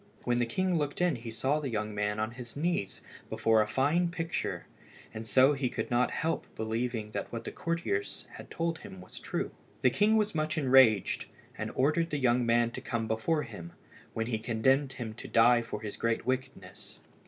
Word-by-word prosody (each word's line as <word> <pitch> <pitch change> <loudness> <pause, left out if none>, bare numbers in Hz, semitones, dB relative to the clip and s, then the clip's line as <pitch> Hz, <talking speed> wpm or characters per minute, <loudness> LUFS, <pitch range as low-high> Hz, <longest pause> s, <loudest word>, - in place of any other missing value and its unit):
When 120 0 +1
the 120 - +1
king 185 +6 0
looked 145 -1 -2
in 175 -4 +2
he 115 -1 -7
saw 135 +6 0
the 145 -3 -3
young 110 -2 -2
man 105 +1 -1
on 110 +1 -1
his 120 +1 -9
knees 155 - -1 0.3
before 110 -1 +3
a 105 - 0
fine 150 +10 +2
picture, 165 - -3 0.5
and 110 +1 -6
so 130 +5 +5
he 135 -3 -1
could - - -4
not 120 +1 +3
help 165 +1 -2
believing 110 0 -2
that - - -4
what 115 - -5
the - - -5
courtiers 165 -12 -2
had - - -11
told 165 -1 -2
him 95 - -10
was 90 - -11
true. - - -3 0.3
The 130 - +5
king 215 - +3
was 210 0 +1
much 155 -1 -1
enraged, 130 - +4 0.3
and - - -4
ordered 155 +5 +2
the 150 - -1
young 125 -2 +2
man 120 0 +3
to - - -6
come 115 -2 -2
before 130 +8 0
him, 100 -9 -9 0.4
when 110 - -1
he 115 -2 -2
condemned 130 +5 +2
him 115 -3 -5
to 110 - -9
die 120 +1 +5
for 115 -2 -6
his 105 -2 -6
great 115 -1 0
wickedness. 130 -7 -4
120 Hz, 200 wpm, -30 LUFS, 110-150 Hz, 0.5 s, so